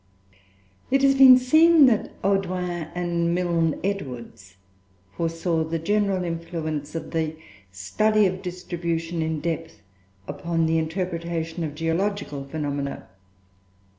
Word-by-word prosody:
It 270 Hz, +1 st, +2 dB
has 275 Hz, 0 st, +6 dB
been 265 Hz, -2 st, +9 dB
seen 315 Hz, +4 st, +6 dB
that 235 Hz, -5 st, +2 dB
Audouin 180 Hz, -4 st, -1 dB
and 170 Hz, -1 st, 0 dB
Milne 170 Hz, -3 st, 0 dB
Edwards 125 Hz, -, -5 dB, 0.6 s
foresaw 165 Hz, 0 st, -1 dB
the 160 Hz, +1 st, -3 dB
general 200 Hz, +2 st, 0 dB
influence 165 Hz, -3 st, -4 dB
of 160 Hz, -1 st, -5 dB
the 160 Hz, -1 st, -1 dB, 0.4 s
study 210 Hz, -, +1 dB
of 185 Hz, 0 st, -1 dB
distribution 170 Hz, -2 st, -3 dB
in 160 Hz, -1 st, -2 dB
depth 165 Hz, -5 st, -4 dB, 0.4 s
upon 165 Hz, +3 st, -1 dB
the 160 Hz, 0 st, +2 dB
interpretation 170 Hz, 0 st, -3 dB
of 150 Hz, -2 st, -4 dB
geological 165 Hz, -2 st, -2 dB
phenomena. 140 Hz, -1 st, -4 dB
170 Hz, 110 wpm, -24 LUFS, 160-190 Hz, 0.6 s, been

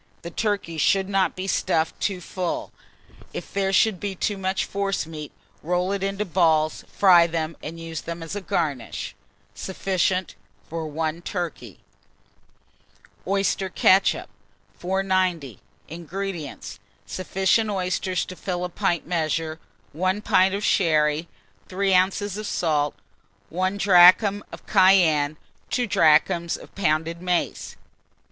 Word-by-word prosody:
The 170 Hz, -, -6 dB
turkey 200 Hz, -6 st, -2 dB
should 190 Hz, +5 st, +2 dB
not 195 Hz, -1 st, +1 dB
be 185 Hz, -, -4 dB
stuffed 165 Hz, -4 st, 0 dB
too 190 Hz, -3 st, -2 dB
full: 180 Hz, 0 st, -4 dB, 0.6 s
if -, -, -7 dB
there 195 Hz, -1 st, 0 dB
should 195 Hz, 0 st, +3 dB
be 200 Hz, -2 st, -4 dB
too 205 Hz, +3 st, -1 dB
much 190 Hz, 0 st, -1 dB
forcemeat, 165 Hz, -6 st, -3 dB, 0.3 s
roll 180 Hz, +3 st, 0 dB
it 200 Hz, -1 st, -2 dB
into 195 Hz, +2 st, -2 dB
balls, 160 Hz, -4 st, +2 dB
fry 175 Hz, -4 st, +6 dB
them, 165 Hz, -1 st, -3 dB
and 165 Hz, +2 st, -7 dB
use 165 Hz, -1 st, -6 dB
them 170 Hz, 0 st, -6 dB
as 165 Hz, +4 st, -6 dB
a 205 Hz, -, -3 dB
garnish. 155 Hz, -8 st, -3 dB, 0.4 s
Sufficient 185 Hz, -1 st, -1 dB, 0.3 s
for 160 Hz, -1 st, -4 dB
1 160 Hz, +2 st, -3 dB
turkey. 170 Hz, -, -5 dB, 1.5 s
OYSTER 195 Hz, 0 st, 0 dB
KETCHUP. 190 Hz, +1 st, +3 dB, 0.5 s
490. 185 Hz, -, -1 dB, 0.3 s
INGREDIENTS. 170 Hz, -1 st, -6 dB, 0.3 s
Sufficient 190 Hz, +4 st, 0 dB
oysters 185 Hz, -1 st, -1 dB
to 185 Hz, -, -9 dB
fill 180 Hz, -1 st, -3 dB
a -, -, -4 dB
pint 170 Hz, -1 st, -1 dB
measure, 160 Hz, -1 st, -2 dB, 0.3 s
1 185 Hz, +6 st, -1 dB
pint 190 Hz, 0 st, +3 dB
of 205 Hz, -, -4 dB
sherry, 155 Hz, -4 st, +2 dB, 0.4 s
3 195 Hz, +1 st, +1 dB
oz. 195 Hz, +2 st, +1 dB
of 215 Hz, 0 st, -5 dB
salt, 150 Hz, -4 st, 0 dB, 0.5 s
1 185 Hz, +3 st, -1 dB
drachm 195 Hz, +2 st, +6 dB
of -, -, -11 dB
cayenne, 170 Hz, -7 st, +4 dB, 0.3 s
2 250 Hz, -, 0 dB
drachms 170 Hz, -2 st, +3 dB
of -, -, -15 dB
pounded 165 Hz, -2 st, -1 dB
mace. 180 Hz, -1 st, -2 dB
180 Hz, 125 wpm, -24 LUFS, 165-195 Hz, 1.5 s, fry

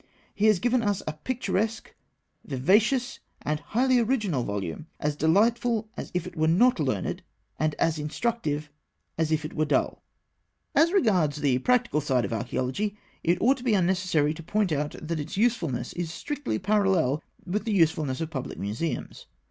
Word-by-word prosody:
He 210 Hz, +2 st, +2 dB
has 215 Hz, -3 st, +5 dB
given 245 Hz, +5 st, +2 dB
us 205 Hz, -3 st, 0 dB
a 155 Hz, -, -3 dB
picturesque, 225 Hz, +4 st, -2 dB, 0.5 s
vivacious, 215 Hz, -, +2 dB, 0.2 s
and 150 Hz, 0 st, -1 dB
highly 245 Hz, -, +2 dB
original 215 Hz, -, +1 dB
volume, 100 Hz, -, -4 dB
as 150 Hz, 0 st, -1 dB
delightful 220 Hz, +7 st, +2 dB
as -, -, -6 dB
if 180 Hz, -, 0 dB
it 180 Hz, -1 st, -8 dB
were 155 Hz, -1 st, +2 dB
not 200 Hz, +8 st, +4 dB
learned, 130 Hz, -10 st, -1 dB, 0.4 s
and 155 Hz, -1 st, +1 dB
as 160 Hz, -1 st, +1 dB
instructive 150 Hz, -2 st, -2 dB, 0.5 s
as 160 Hz, -1 st, +1 dB
if 155 Hz, -1 st, +1 dB
it 155 Hz, -, -6 dB
were 155 Hz, -, +1 dB
dull. 150 Hz, -, 0 dB, 0.7 s
As 330 Hz, +2 st, +4 dB
regards 185 Hz, -, +2 dB
the 130 Hz, -3 st, +2 dB
practical 235 Hz, -, +2 dB
side 130 Hz, -6 st, +1 dB
of 100 Hz, -, -4 dB
Archaeology, 130 Hz, -, -2 dB, 0.3 s
it 170 Hz, +1 st, +3 dB
ought 260 Hz, +4 st, +4 dB
to 245 Hz, -, -10 dB
be 235 Hz, -5 st, +3 dB
unnecessary 180 Hz, -5 st, +2 dB
to 165 Hz, -, -9 dB
point 205 Hz, +3 st, 0 dB
out 150 Hz, 0 st, -1 dB
that 160 Hz, 0 st, -3 dB
its 155 Hz, +5 st, -5 dB
usefulness 210 Hz, -, 0 dB
is 175 Hz, -2 st, -3 dB
strictly 290 Hz, -, -3 dB
parallel 190 Hz, -8 st, +2 dB, 0.2 s
with 200 Hz, +5 st, -2 dB
the 225 Hz, -, -1 dB
usefulness 160 Hz, -6 st, +2 dB
of 165 Hz, 0 st, -3 dB
public 135 Hz, -4 st, -5 dB
museums. 110 Hz, +11 st, -4 dB
170 Hz, 165 wpm, -27 LUFS, 150-220 Hz, 0.7 s, has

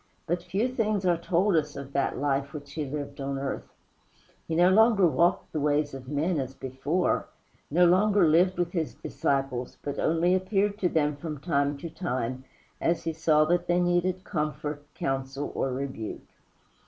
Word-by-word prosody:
But 175 Hz, +2 st, -1 dB
few 200 Hz, +7 st, 0 dB
things 215 Hz, -6 st, -1 dB
are 175 Hz, -1 st, +4 dB
told 175 Hz, +3 st, +1 dB
us 150 Hz, -2 st, 0 dB
of 140 Hz, 0 st, -8 dB
that 140 Hz, -, 0 dB
life 140 Hz, 0 st, -1 dB
which 145 Hz, -2 st, -8 dB
he 155 Hz, -1 st, -2 dB
lived 145 Hz, 0 st, -5 dB
on 135 Hz, 0 st, -2 dB
earth. 135 Hz, 0 st, -4 dB, 0.8 s
He 160 Hz, -, -1 dB
no 175 Hz, +2 st, +5 dB
longer 220 Hz, -1 st, +5 dB
walked 170 Hz, +1 st, +2 dB
the 155 Hz, -, -1 dB
ways 145 Hz, 0 st, +1 dB
of 130 Hz, -1 st, -8 dB
men 155 Hz, +3 st, 0 dB
as 135 Hz, 0 st, -4 dB
before 135 Hz, +8 st, -1 dB, 0.4 s
no 175 Hz, +4 st, +4 dB
longer 190 Hz, +1 st, +4 dB
lived 175 Hz, +4 st, +4 dB
with 175 Hz, -1 st, 0 dB
his 165 Hz, -4 st, -2 dB
disciples, 135 Hz, -3 st, -2 dB
but 145 Hz, -, -4 dB
only 165 Hz, +3 st, +2 dB
appeared 195 Hz, +2 st, +1 dB
to 180 Hz, -, +2 dB
them 150 Hz, -3 st, +1 dB
from 155 Hz, -1 st, -5 dB
time 140 Hz, -2 st, 0 dB
to 165 Hz, +4 st, -6 dB
time, 130 Hz, -6 st, -3 dB, 0.4 s
as 170 Hz, 0 st, +1 dB
he 165 Hz, -, -2 dB
saw 155 Hz, -1 st, +3 dB
that 175 Hz, +2 st, +1 dB
they 175 Hz, 0 st, +3 dB
needed 175 Hz, +1 st, +1 dB
comfort, 150 Hz, -4 st, -3 dB
counsel, 135 Hz, +1 st, -3 dB
or 135 Hz, -, -1 dB
rebuke. 130 Hz, -4 st, -4 dB
155 Hz, 175 wpm, -27 LUFS, 140-180 Hz, 0.8 s, no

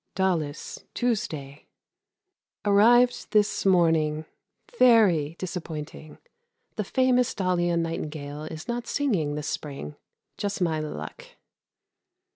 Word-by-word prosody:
Daulis, 170 Hz, -6 st, -2 dB
Tuesday. 155 Hz, -, -2 dB, 1.0 s
Arrived 240 Hz, +5 st, +4 dB
this 210 Hz, -2 st, +2 dB
morning. 160 Hz, -4 st, +3 dB, 0.5 s
Very 185 Hz, -11 st, +5 dB
disappointing; 160 Hz, -4 st, -6 dB, 0.6 s
the 215 Hz, -, -1 dB
famous 250 Hz, +3 st, +2 dB
Daulian 175 Hz, -3 st, +1 dB
nightingale 150 Hz, -2 st, -5 dB
is 160 Hz, +3 st, -8 dB
not 240 Hz, -1 st, -3 dB
singing 190 Hz, -, 0 dB
this 150 Hz, 0 st, -4 dB
spring. 135 Hz, -, -5 dB, 0.4 s
Just 200 Hz, -1 st, -3 dB
my 165 Hz, -4 st, +1 dB
luck. 155 Hz, -, -7 dB
175 Hz, 90 wpm, -26 LUFS, 155-215 Hz, 1.0 s, Very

